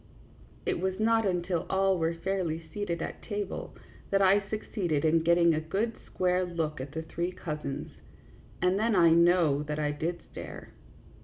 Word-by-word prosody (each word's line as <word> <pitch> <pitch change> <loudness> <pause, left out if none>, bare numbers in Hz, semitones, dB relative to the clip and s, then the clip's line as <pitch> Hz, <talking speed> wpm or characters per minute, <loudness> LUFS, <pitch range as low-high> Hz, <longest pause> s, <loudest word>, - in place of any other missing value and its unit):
It - - 0
was 190 +1 -1
not 225 -1 +3
until 175 -2 -1
all 190 -1 +2
were 165 +1 0
fairly 165 -3 -2
seated 205 -5 -2
at - - -6
table 205 -3 -4 0.3
that 195 - +3
I 195 +1 +5
succeeded 180 -8 -1
in 160 +1 +4
getting 170 0 +4
a 155 - 0
good 200 +9 -1
square 180 0 +1
look 160 -5 -3
at 135 +2 -7
the 160 +1 -3
three 170 +2 -3
cousins, 150 -6 -5 0.7
and 180 +2 +3
then 225 0 +2
I 170 -3 +6
know 170 -3 +4
that 150 0 -3
I 150 -1 0
did 165 +4 -3
stare. - - -8
175 Hz, 165 wpm, -29 LUFS, 160-195 Hz, 0.7 s, I